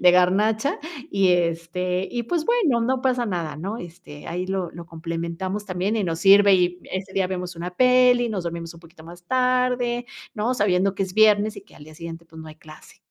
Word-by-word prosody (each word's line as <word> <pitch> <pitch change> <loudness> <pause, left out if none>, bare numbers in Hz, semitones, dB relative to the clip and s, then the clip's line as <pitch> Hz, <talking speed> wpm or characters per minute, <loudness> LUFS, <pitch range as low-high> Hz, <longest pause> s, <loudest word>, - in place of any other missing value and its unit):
de 180 - +7
garnacha 210 +8 +2 0.3
y, 195 -1 +2
este, 180 +1 0
y, 240 -1 -2
pues, 320 +6 -1
bueno, 350 - +2
no 255 +2 0
pasa 255 -2 +1
nada, 170 -7 -3
¿no? 195 +8 -5
Este, 165 -5 -11
ahí 180 +2 -3
lo 190 -3 -2
lo 170 +1 -10
complementamos 170 +4 -4
también 190 +3 -2
y 210 - 0
nos 165 -2 -3
sirve, 200 0 +7
y 180 -1 +1
ese 190 +1 -5
día 190 -1 +1
vemos 180 -1 -5
una 175 +2 -5
peli, 250 0 +4
nos 200 -5 -3
dormimos 170 0 -5
un 165 - -14
poquito 165 -1 -16
más 175 +1 -13
tarde, 250 0 +1 0.3
¿no? 225 +2 0
Sabiendo 195 -3 +1
que - - -1
es 185 -1 -5
viernes 215 0 +4
y 200 - -9
que - - -22
al 145 - -13
día 155 0 -14
siguiente, 165 0 -8
pues, 160 0 -12
no 160 - -10
hay 155 - -12
clase. 155 0 -15
185 Hz, 210 wpm, -23 LUFS, 170-220 Hz, 0.3 s, de